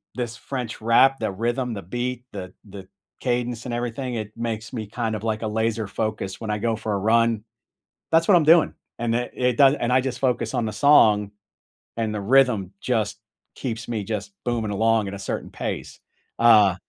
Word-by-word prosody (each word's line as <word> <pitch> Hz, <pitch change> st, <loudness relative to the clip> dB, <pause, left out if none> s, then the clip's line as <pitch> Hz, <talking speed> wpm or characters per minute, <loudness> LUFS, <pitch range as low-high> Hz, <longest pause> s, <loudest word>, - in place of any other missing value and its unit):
This 120 Hz, -2 st, -3 dB
French 125 Hz, -3 st, -5 dB
rap, 130 Hz, +4 st, +4 dB
the 110 Hz, -2 st, -1 dB
rhythm, 120 Hz, +4 st, -2 dB
the 100 Hz, -, -6 dB
beat, 120 Hz, +6 st, -3 dB
the 95 Hz, -3 st, -7 dB, 0.2 s
the 95 Hz, -1 st, -10 dB, 0.3 s
cadence 120 Hz, -1 st, -2 dB
and 125 Hz, -, -4 dB
everything, 120 Hz, +1 st, -3 dB
it 110 Hz, -2 st, -4 dB
makes 115 Hz, -1 st, -4 dB
me 110 Hz, -4 st, -4 dB
kind 115 Hz, +1 st, -2 dB
of, 105 Hz, -, -6 dB
like, 110 Hz, -1 st, -1 dB
a -, -, -1 dB
laser-focus 110 Hz, -2 st, -2 dB
when 110 Hz, -, -5 dB
I 105 Hz, -, 0 dB
go 115 Hz, +1 st, 0 dB
for 110 Hz, -1 st, -3 dB
a -, -, +1 dB
run. 115 Hz, +1 st, +2 dB, 0.7 s
That's 165 Hz, 0 st, +4 dB
what 200 Hz, -, +6 dB
I'm 170 Hz, -, +5 dB
doing, 160 Hz, +1 st, +5 dB, 0.3 s
and 115 Hz, -1 st, 0 dB
it 120 Hz, +1 st, -2 dB
it 125 Hz, -2 st, +1 dB
does 140 Hz, 0 st, +6 dB
and 120 Hz, +1 st, 0 dB
I 130 Hz, -, +4 dB
just 130 Hz, -1 st, -4 dB
focus 125 Hz, -2 st, 0 dB
on 120 Hz, -, 0 dB
the 110 Hz, -, -3 dB
song, 105 Hz, -6 st, +5 dB, 0.7 s
and 110 Hz, -2 st, -1 dB
the 105 Hz, -, -3 dB
rhythm 110 Hz, -4 st, +3 dB
just 110 Hz, -4 st, -1 dB, 0.4 s
keeps 115 Hz, -2 st, -5 dB
me 110 Hz, -3 st, -2 dB
just 100 Hz, -3 st, -4 dB
booming 115 Hz, -3 st, -1 dB
along 110 Hz, 0 st, +2 dB
at 95 Hz, -, -5 dB
a 100 Hz, -, -6 dB
certain -, -, -4 dB
pace, -, -, -5 dB, 0.4 s
uh 105 Hz, -5 st, +6 dB
115 Hz, 195 wpm, -24 LUFS, 105-125 Hz, 0.7 s, what